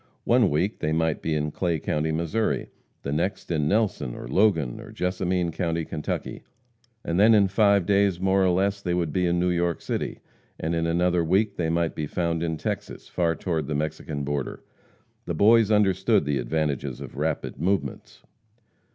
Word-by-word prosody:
One 120 -4 +4
week 90 +8 0
they 75 - -1
might 80 -1 0
be 80 - -1
in 75 0 -1
Clay 85 +1 -1
county, 75 +1 -1
Missouri, 85 +8 0
and - - -13 0.3
the 70 - -3
next 85 +5 -2
in 75 -3 +1
Nelson, 105 - 0
or - - -7
Logan, 85 - +2
or - - -11
Jessamine 90 -1 -1
county, 85 -1 -2
Kentucky, 75 - -4 0.6
and 85 +2 0
then 110 +2 +7
in 100 -2 +5
five 100 -1 +3
days 100 -2 +2
more 95 +1 +2
or 95 - +4
less 100 +3 +1
they 90 -3 -1
would 85 -4 -1
be 90 -1 +1
in 85 0 +1
New 90 0 +2
York 85 -1 0
City, - - -3 0.4
and 80 +2 -2
in 85 0 0
another 85 +1 +2
week 100 +5 +1
they 80 -2 -1
might 85 0 0
be 75 -2 -3
found 85 0 -1
in 80 -1 -1
Texas - - -5
far 85 -2 0
toward 80 -1 -2
the 75 - -2
Mexican 75 -1 -3
border. 70 -1 -3 0.6
The - - -3
Boys 110 +1 +5
understood 100 -2 +3
the 70 -2 0
advantages 70 0 -2
of - - -9
rapid 75 -2 -2
movements. 95 +4 -2
85 Hz, 185 wpm, -25 LUFS, 80-95 Hz, 0.6 s, then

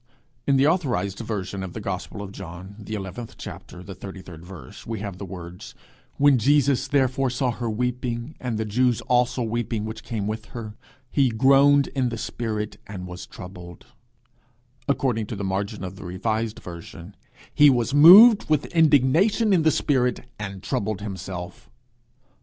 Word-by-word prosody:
In 140 - +4
the 135 - +4
authorized 135 - 0
version 100 -4 -4
of 95 -2 -6
the - - -5
gospel 100 +1 -5
of 100 - -8
John, 95 +1 -9
the 110 +1 -6
eleventh 100 +3 -7
chapter, 90 0 -9
the 95 - -8
thirty 95 +1 -9
third 85 -2 -11
verse, 85 -8 -11
we 115 -2 -5
have 100 -3 -6
the 100 - -5
words: 90 -1 -9 0.4
'When 140 -2 +5
Jesus 140 +1 +2
therefore 135 -1 +1
saw 125 0 0
her 120 0 -4
weeping, 125 +3 -3
and 120 -4 -3
the 110 - -2
Jews 120 +3 +1
also 125 0 +1
weeping 115 -1 -2
which 110 0 -6
came 110 -5 -4
with 110 +1 -4
her, 110 -3 -6 0.4
he 135 -3 +3
groaned 140 +4 +5
in 130 -3 -1
the 115 - -5
spirit 110 -2 -4
and 95 -3 -7
was 90 -1 -8
troubled;' 90 -2 -11 1.0
according 125 -6 0
to 110 - -5
the 100 - -5
margin 95 0 -3
of 95 +1 -7
the - - -10
revised 110 +5 -2
version, 85 +2 -10 0.4
'he 150 0 +7
was 125 -1 +1
moved 195 +10 +9
with 155 -2 +2
indignation 165 - +4
in 175 - +4
the 160 - +4
spirit, 125 -5 +1 0.2
and 100 -2 -6
troubled 105 -1 -2
himself.' 95 -3 -7
110 Hz, 165 wpm, -24 LUFS, 95-130 Hz, 1.0 s, moved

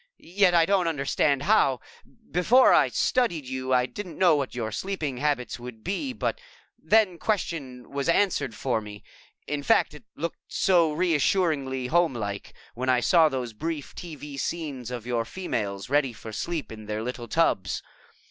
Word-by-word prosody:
Yet 180 0 +2
I 165 -1 +6
don't 190 -2 +2
understand 140 -2 +1
how. 140 - +3 0.5
Before 235 +9 +5
I - - +5
studied 215 - +1
you, 130 0 -4
I 125 -1 +4
didn't 180 +2 -8
know 180 -4 +5
what 140 -4 -2
your 110 -3 -3
sleeping 155 - -3
habits 140 -3 -1
would 120 -2 -10
be, 260 +8 -2
but 485 - -3 0.4
that 210 -6 +3
question 145 - -3
was 140 +1 -2
answered 165 - +1
for 115 0 -1
me 105 -1 -10 0.4
in 145 -1 -3
fact, 225 +10 +3
it - - -13
looked 170 +1 -4
so 170 -4 +3
reassuringly 150 -5 +1
homelike 125 - 0 0.2
when 130 +2 -3
I 125 -1 +4
saw 160 +6 +5
those 125 -4 -4
brief 155 +4 -4
TV 150 -4 -8
scenes 140 -8 -4
of 120 -2 -6
your 120 -2 0
females 110 - -4
ready 135 -2 +1
for 110 0 -9
sleep 165 +7 -4
in 110 -1 -9
their 105 +1 -3
little 120 0 -5
tubs. 105 - +1
145 Hz, 160 wpm, -26 LUFS, 125-175 Hz, 0.5 s, I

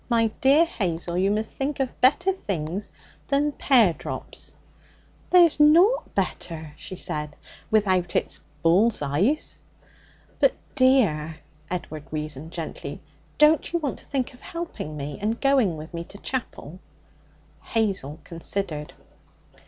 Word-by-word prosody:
My 230 -2 +3
dear 280 +5 +6
Hazel, 175 - -3
you 190 +2 +2
must 215 +2 -1
think 280 +1 -3
of 265 -2 -3
better 295 +9 +4
things 195 - -4 0.4
than 285 +1 +2
pear 240 -10 +4
drops!' - - -5 0.7
'There's 345 -4 +6
nought 345 +11 +5
better,' 165 -5 -3
she 185 - -8
said, 150 -3 -4 0.3
'without 185 -5 +2
it's - - 0 0.2
bull's 185 +3 +3
eyes.' 185 - 0 0.8
'But, - - +4 0.2
dear,' 215 - +3 0.3
Edward 155 -4 -5
reasoned 155 0 -4
gently, 165 -3 -6 0.4
'don't 300 +1 +4
you 340 - +1
want 295 -5 -3
to - - -17
think 265 -3 -2
of 245 - -17
helping 335 - -6
me, 145 0 -5
and 220 +3 -1
going 260 - +3
with 155 +3 -9
me 170 0 -4
to 200 - -10
chapel?' 195 - -5 0.8
Hazel 195 - -1
considered. 165 -3 -4
200 Hz, 130 wpm, -25 LUFS, 160-275 Hz, 0.8 s, dear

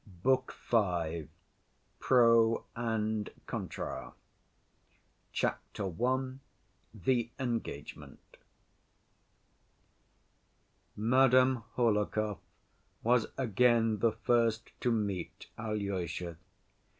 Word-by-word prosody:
Book 130 0 +2 0.2
V. 85 -8 +1 0.7
Pro 115 -2 +4
And 110 -2 -1 0.2
Contra - - -5 1.2
Chapter 95 -3 -2
I. 130 0 -1 0.5
The 115 +3 0
Engagement 115 - -4 2.8
Madame 130 +1 +4
Hohlakov 105 -3 +1 0.6
was 120 0 +3
again 115 -2 +3
the 115 -2 +3
first 115 0 +1
to 125 - +2
meet 100 -5 -2
Alyosha. 95 -6 -3
115 Hz, 65 wpm, -32 LUFS, 105-120 Hz, 2.8 s, Pro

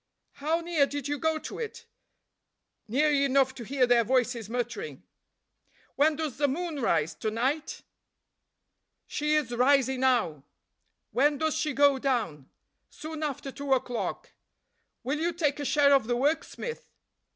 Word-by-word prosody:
"How 315 +4 -1
near 330 -4 +2
did 285 -1 -4
you 290 0 -2
go 320 +1 +1
to - - -7
it?" 455 -2 -6 1.0
"Near 290 +7 +2
enough 275 -2 +3
to 250 - -8
hear 260 +2 +2
their 240 -1 +4
voices 245 -2 0
muttering." 245 - -4 0.9
"When 300 +2 +3
does 310 -4 -4
the 290 - +3
moon 310 +1 -3
rise, 165 -8 +1
to 220 - -3
night?" 265 +8 -2 1.2
"She 300 +1 0
is 295 -6 0
rising 265 +1 +3
now." 240 - +1 0.7
"When 290 +3 +3
does 315 +1 0
she 305 -1 -1
go 280 0 +4
down?" 220 - -2 0.4
"Soon 315 0 -8
after 280 -2 -3
two 280 0 -1
o'clock." 250 -2 -2 0.7
"Will 280 +4 -1
you 335 +2 0
take 300 -4 0
a 290 - -3
share 280 0 +4
of 270 -5 +3
the 240 - +1
work, 290 +6 +1
Smith?" 475 -1 -7
280 Hz, 150 wpm, -28 LUFS, 250-300 Hz, 1.2 s, their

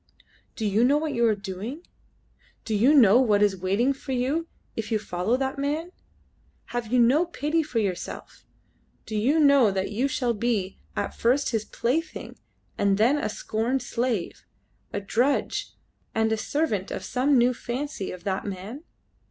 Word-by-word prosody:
"Do 220 - -3
you 210 +3 +2
know 275 +4 +4
what 305 -1 -2
you 235 -2 +3
are 215 - +3
doing? 205 - -6 0.8
Do 220 - -2
you 225 +7 +4
know 245 -5 +7
what 210 -5 +3
is 205 -2 +3
waiting 200 +9 +1
for 270 0 -6
you 275 +7 0 0.3
if 220 -1 -4
you 220 - +3
follow 210 +3 -1
that 265 +1 -2
man? 305 +5 -2 0.8
Have 240 -2 -3
you 250 - +3
no 250 +7 +5
pity 325 -1 0
for 295 -6 -5
yourself? 195 -5 -3 0.6
Do 215 - -5
you 260 +10 +2
know 280 -6 +6
that 190 0 -2
you 240 +6 +1
shall 250 -3 0
be 210 -4 -1 0.2
at - - -2
first 255 +5 +2
his 220 -2 -1
plaything 305 +8 -2 0.4
and 200 -1 +3
then 245 +8 +3
a - - -1
scorned 250 - -2
slave, 235 -7 -2 0.5
a - - -2
drudge, 240 +8 0 0.5
and 220 0 +2
a - - +3
servant 215 -4 -1
of - - -5
some 265 +2 +2
new 245 +1 +4
fancy 245 -3 -4
of 180 - -9
that 195 -2 -2
man?" 205 - -6
240 Hz, 170 wpm, -26 LUFS, 210-275 Hz, 0.8 s, know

